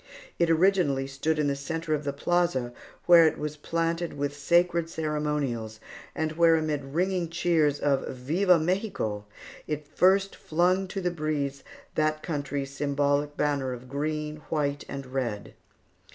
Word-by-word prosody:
It 170 Hz, -1 st, +3 dB
originally 165 Hz, -5 st, +3 dB
stood 140 Hz, +4 st, -1 dB
in 150 Hz, -, +1 dB
the 140 Hz, -1 st, +1 dB
centre 160 Hz, +3 st, -3 dB
of 150 Hz, -1 st, -2 dB
the 140 Hz, -, 0 dB
plaza, 140 Hz, -5 st, 0 dB, 0.3 s
where 170 Hz, -2 st, +8 dB
it -, -, -1 dB
was 150 Hz, 0 st, -4 dB
planted 165 Hz, +2 st, -2 dB
with 145 Hz, 0 st, -2 dB
sacred 170 Hz, +2 st, +2 dB
ceremonials, 150 Hz, -9 st, -2 dB, 0.4 s
and 160 Hz, 0 st, -1 dB
where 165 Hz, +1 st, +5 dB
amid 155 Hz, -3 st, -1 dB
ringing 175 Hz, +5 st, -1 dB
cheers 160 Hz, -4 st, +2 dB
of 140 Hz, -2 st, +1 dB
"Viva 170 Hz, +9 st, +2 dB
Mexico!" 160 Hz, -, -2 dB, 0.4 s
it 150 Hz, -1 st, -4 dB
first 190 Hz, +6 st, +3 dB
flung 180 Hz, +4 st, +1 dB
to 195 Hz, +1 st, -4 dB
the 180 Hz, -1 st, 0 dB
breeze 150 Hz, -4 st, -2 dB, 0.3 s
that 155 Hz, 0 st, 0 dB
country's 145 Hz, -3 st, -3 dB
symbolical 145 Hz, +1 st, 0 dB
banner 140 Hz, -3 st, 0 dB
of 125 Hz, +1 st, -9 dB
green, 150 Hz, +2 st, -3 dB
white, 145 Hz, -2 st, -1 dB
and 140 Hz, -1 st, -5 dB
red. 125 Hz, -6 st, -3 dB
150 Hz, 145 wpm, -27 LUFS, 140-170 Hz, 0.4 s, where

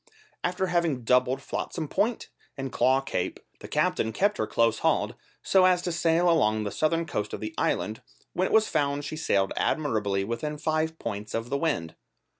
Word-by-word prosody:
After 180 Hz, +2 st, 0 dB
having 170 Hz, -8 st, 0 dB
doubled 125 Hz, +3 st, +2 dB
Flotsam 160 Hz, +2 st, -4 dB
Point 210 Hz, +9 st, -1 dB, 0.3 s
and 135 Hz, -1 st, -4 dB
Claw 130 Hz, +1 st, +3 dB
Cape, 90 Hz, -9 st, -3 dB, 0.2 s
the -, -, -9 dB
captain 110 Hz, -, +1 dB
kept 205 Hz, -, +1 dB
her -, -, 0 dB
close 115 Hz, -1 st, +2 dB
hauled, -, -, +1 dB, 0.3 s
so 190 Hz, -1 st, +5 dB
as 180 Hz, -1 st, +3 dB
to 180 Hz, -, -1 dB
sail 170 Hz, +1 st, +2 dB
along 110 Hz, -11 st, +3 dB
the 100 Hz, -, -3 dB
southern 165 Hz, +2 st, +1 dB
coast 105 Hz, -9 st, -3 dB
of -, -, -3 dB
the 110 Hz, 0 st, -5 dB
island, 110 Hz, +2 st, -1 dB, 0.3 s
when 185 Hz, +1 st, +1 dB
it -, -, -5 dB
was 220 Hz, 0 st, +5 dB
found 140 Hz, 0 st, 0 dB
she 155 Hz, -, -4 dB
sailed 100 Hz, -11 st, +1 dB
admirably 105 Hz, -10 st, 0 dB
within 135 Hz, +8 st, -3 dB
five 155 Hz, +1 st, -1 dB
points 105 Hz, -4 st, -5 dB
of 115 Hz, +2 st, -3 dB
the -, -, +1 dB
wind. 140 Hz, -, -1 dB
145 Hz, 185 wpm, -27 LUFS, 110-170 Hz, 0.3 s, so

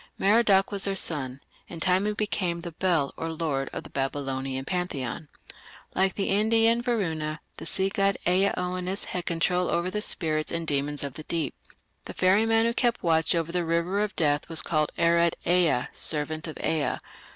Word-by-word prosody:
Merodach 200 Hz, -2 st, +4 dB
was 200 Hz, -1 st, -1 dB
their 195 Hz, -1 st, -1 dB
son: 140 Hz, -7 st, -1 dB, 0.3 s
in 170 Hz, -, -8 dB
time 185 Hz, +4 st, +2 dB
he 210 Hz, -, 0 dB
became 185 Hz, -5 st, -1 dB
the 170 Hz, 0 st, -6 dB
Bel, 165 Hz, -4 st, 0 dB
or 165 Hz, 0 st, -3 dB
"Lord", 150 Hz, -4 st, -2 dB
of -, -, -6 dB
the -, -, -11 dB
Babylonian 135 Hz, -1 st, -3 dB
pantheon. 160 Hz, -5 st, -3 dB, 0.7 s
Like 190 Hz, 0 st, +1 dB
the 195 Hz, -, -1 dB
Indian 225 Hz, +3 st, +3 dB
Varuna, 160 Hz, -11 st, -1 dB, 0.2 s
the -, -, -7 dB
sea 190 Hz, 0 st, +1 dB
god, 195 Hz, 0 st, +1 dB
Ea 185 Hz, +3 st, +4 dB
Oannes 180 Hz, +2 st, -2 dB
had 180 Hz, -1 st, -4 dB
control 180 Hz, +1 st, +1 dB
over 175 Hz, +2 st, 0 dB
the 210 Hz, -, -2 dB
spirits 155 Hz, -6 st, 0 dB
and 170 Hz, -1 st, -2 dB
demons 145 Hz, -1 st, -1 dB
of 140 Hz, -2 st, -5 dB
the 155 Hz, -, -8 dB
deep. 160 Hz, -5 st, -1 dB, 0.5 s
The -, -, -8 dB
"ferryman" 225 Hz, +4 st, +3 dB
who 235 Hz, -, +1 dB
kept 240 Hz, -1 st, 0 dB
watch 165 Hz, 0 st, +3 dB
over 165 Hz, 0 st, -1 dB
the 175 Hz, 0 st, 0 dB
river 170 Hz, +4 st, 0 dB
of 210 Hz, -1 st, -2 dB
death 150 Hz, -1 st, +1 dB
was 165 Hz, -1 st, +5 dB
called 155 Hz, -2 st, 0 dB
Arad 170 Hz, 0 st, +3 dB
Ea, 170 Hz, -8 st, +3 dB
"servant 155 Hz, +1 st, -1 dB
of 160 Hz, -, -6 dB
Ea". 155 Hz, -3 st, +1 dB
170 Hz, 180 wpm, -26 LUFS, 155-195 Hz, 0.7 s, was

